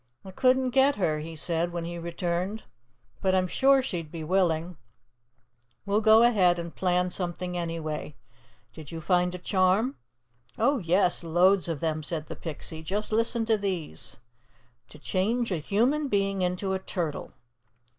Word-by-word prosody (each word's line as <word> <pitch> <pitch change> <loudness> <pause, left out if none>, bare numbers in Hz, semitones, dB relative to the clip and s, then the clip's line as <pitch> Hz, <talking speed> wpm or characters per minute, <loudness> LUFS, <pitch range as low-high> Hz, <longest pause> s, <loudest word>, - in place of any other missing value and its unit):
"I 190 - -8
couldn't 255 +4 +2
get 270 +3 +4
her," 155 -6 0
he 160 +2 -7
said 170 +2 +1
when 170 -1 -4
he 170 0 -5
returned. 175 +4 -3 0.6
"But 190 -1 +2
I'm 185 -1 +2
sure 270 +6 +4
she'll 175 -9 -3
be 160 +1 -8
willing. 170 -1 0 1.1
We'll 205 +2 +1
go 220 +1 +6
ahead 190 -7 +4
and 170 -1 -6
plan 180 -1 +1
something 180 0 -2
anyway. 165 -3 -4 0.6
Did 155 -3 -10
you 165 - -5
find 180 +2 +1
a - - -4
charm?" 190 +7 +1 0.6
"Oh, 280 -1 +2
yes, 180 +1 +1
loads 175 +3 +3
of 165 -4 -3
them," 155 -1 -1
said 155 +1 -4
the - - -7
Pixie. 160 0 -7
"Just 200 +7 -3
listen 230 +1 +1
to 220 -1 +2
these: 185 -6 -4 0.7
"'TO - - -13
CHANGE 195 - -1
A 180 - 0
HUMAN 245 - +1
BEING 195 -4 0
INTO 180 +2 -1
A 190 - -1
TURTLE. 170 -5 -4
180 Hz, 155 wpm, -27 LUFS, 165-205 Hz, 1.1 s, go